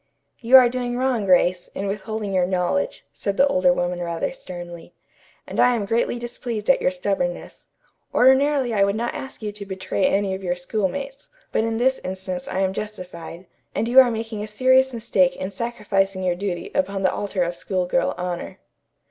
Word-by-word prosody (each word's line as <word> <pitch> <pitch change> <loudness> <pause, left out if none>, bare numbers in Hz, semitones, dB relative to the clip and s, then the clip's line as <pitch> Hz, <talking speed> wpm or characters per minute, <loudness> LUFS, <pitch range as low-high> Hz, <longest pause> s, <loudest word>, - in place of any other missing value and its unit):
"You 250 +3 +7
are 255 -2 +7
doing 245 0 -3
wrong, 250 -5 0
Grace, 180 -1 +3
in 195 - -3
withholding 210 +1 -3
your 180 -1 +2
knowledge," 185 0 -1
said 200 -1 -3
the 275 - +6
older 185 -9 +3
woman 175 0 -1
rather 170 -1 -2
sternly, 175 -8 -9 0.5
"and - - -5
I 245 0 +5
am 215 -3 -2
greatly 230 +3 0
displeased 240 -1 -1
at - - +1
your - - +3
stubbornness. 200 +8 -3 0.4
Ordinarily 265 -1 +4
I 200 -2 +3
would 200 +1 +1
not 235 +2 -2
ask 265 -4 -8
you 210 - -2
to 205 0 -7
betray 190 0 -1
any 195 -1 +1
of 190 - -5
your 175 -1 0
schoolmates, 220 +9 -3 0.2
but 220 - +1
in 225 0 -1
this 260 +3 +1
instance 185 -1 -5
I 190 - -2
am 190 0 +1
justified, 180 -4 -7 0.3
and 225 - 0
you 250 +3 +7
are 255 -2 +7
making 225 -2 -4
a 210 - -4
serious 260 +4 +3
mistake 190 -6 +1
in 190 - -5
sacrificing 195 -3 -1
your 180 -1 +2
duty 180 -2 -4
upon 195 +1 -1
the 185 - +2
altar 200 -3 -1
of 175 0 -3
school 185 -1 -2
girl 175 -1 0
honor." 180 -1 -4
200 Hz, 190 wpm, -23 LUFS, 185-235 Hz, 0.5 s, You